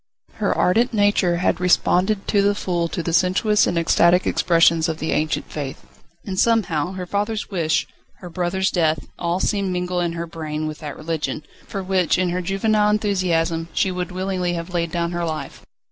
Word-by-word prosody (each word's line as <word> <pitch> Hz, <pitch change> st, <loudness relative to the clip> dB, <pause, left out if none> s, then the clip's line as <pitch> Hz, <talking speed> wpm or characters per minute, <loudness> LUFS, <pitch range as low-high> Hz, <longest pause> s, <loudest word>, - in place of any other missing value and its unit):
Her -, -, 0 dB
ardent 230 Hz, +6 st, +2 dB
nature 205 Hz, -4 st, +2 dB
had 180 Hz, -, +1 dB
responded 185 Hz, +3 st, +2 dB
to 205 Hz, -, +3 dB
the 200 Hz, 0 st, +2 dB
full 175 Hz, -4 st, -1 dB
to 170 Hz, -, -4 dB
the 170 Hz, -, -2 dB
sensuous 190 Hz, +4 st, +3 dB
and 175 Hz, -, -1 dB
ecstatic 170 Hz, +2 st, +3 dB
expressions 165 Hz, -1 st, +3 dB
of 160 Hz, -, -2 dB
the 160 Hz, 0 st, -3 dB
ancient 155 Hz, 0 st, -1 dB
faith. 140 Hz, -3 st, -6 dB, 0.4 s
And 190 Hz, -1 st, -3 dB
somehow 185 Hz, -8 st, +1 dB
her 185 Hz, -1 st, -5 dB
father's 205 Hz, +3 st, -2 dB
wish, 165 Hz, -4 st, +1 dB, 0.3 s
her 180 Hz, -, -10 dB
brother's 185 Hz, +2 st, 0 dB
death, 160 Hz, -4 st, +1 dB
all 170 Hz, +1 st, -1 dB
seemed 200 Hz, -1 st, 0 dB
mingled 180 Hz, 0 st, -1 dB
in 170 Hz, -1 st, -2 dB
her 170 Hz, 0 st, -4 dB
brain 155 Hz, -2 st, -5 dB
with 155 Hz, -1 st, -5 dB
that 150 Hz, -3 st, -7 dB
religion, 160 Hz, -1 st, -3 dB, 0.2 s
for 195 Hz, -, -4 dB
which 185 Hz, -2 st, +1 dB
in 185 Hz, 0 st, +1 dB
her 180 Hz, +1 st, -1 dB
juvenile 210 Hz, +3 st, +1 dB
enthusiasm 175 Hz, -6 st, 0 dB
she 190 Hz, -, +1 dB
would 180 Hz, 0 st, -4 dB
willingly 185 Hz, -1 st, -2 dB
have 170 Hz, +1 st, -5 dB
laid 170 Hz, -1 st, -1 dB
down 170 Hz, 0 st, -1 dB
her 175 Hz, 0 st, -2 dB
life. 155 Hz, -4 st, -5 dB
180 Hz, 185 wpm, -21 LUFS, 165-190 Hz, 0.4 s, to